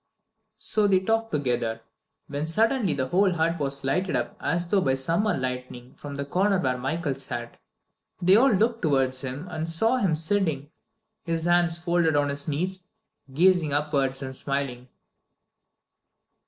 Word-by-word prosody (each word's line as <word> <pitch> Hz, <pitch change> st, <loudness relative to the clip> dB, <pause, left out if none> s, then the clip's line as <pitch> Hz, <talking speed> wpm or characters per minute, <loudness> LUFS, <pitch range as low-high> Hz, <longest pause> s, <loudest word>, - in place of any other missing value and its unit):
'" 220 Hz, 0 st, -52 dB, 0.2 s
So 210 Hz, -1 st, +4 dB
they 190 Hz, -2 st, +4 dB
talked 225 Hz, +3 st, -1 dB
together, 120 Hz, -6 st, -1 dB, 0.4 s
when 145 Hz, +2 st, -4 dB
suddenly 220 Hz, -, +2 dB
the 130 Hz, -1 st, -2 dB
whole 190 Hz, +2 st, +3 dB
hut 165 Hz, 0 st, 0 dB
was 140 Hz, -1 st, -3 dB
lighted 180 Hz, +7 st, 0 dB
up -, -, -2 dB
as 170 Hz, +1 st, 0 dB
though 195 Hz, +2 st, +2 dB
by 130 Hz, -5 st, +1 dB
summer 170 Hz, +9 st, 0 dB
lightning 125 Hz, -1 st, -5 dB
from 145 Hz, -1 st, -8 dB
the 140 Hz, 0 st, -4 dB
corner 190 Hz, +6 st, +1 dB
where 130 Hz, -7 st, 0 dB
Michael 145 Hz, +3 st, -2 dB
sat. 125 Hz, -3 st, -5 dB, 0.6 s
They 185 Hz, +2 st, +5 dB
all 260 Hz, +5 st, +6 dB
looked 225 Hz, +3 st, +1 dB
towards 135 Hz, -4 st, +1 dB
him 135 Hz, +6 st, -6 dB
and 160 Hz, -1 st, -4 dB
saw 225 Hz, +10 st, +3 dB
him 195 Hz, -10 st, +1 dB
sitting, 160 Hz, -4 st, 0 dB, 0.5 s
his 165 Hz, -1 st, -2 dB
hands 175 Hz, -1 st, +3 dB
folded 170 Hz, -2 st, +1 dB
on 145 Hz, 0 st, +2 dB
his 140 Hz, 0 st, -5 dB
knees, 180 Hz, +5 st, -3 dB, 0.4 s
gazing 170 Hz, 0 st, +3 dB
upwards 140 Hz, -2 st, 0 dB
and 130 Hz, 0 st, -6 dB
smiling. 135 Hz, -3 st, -3 dB
160 Hz, 155 wpm, -26 LUFS, 135-185 Hz, 0.6 s, all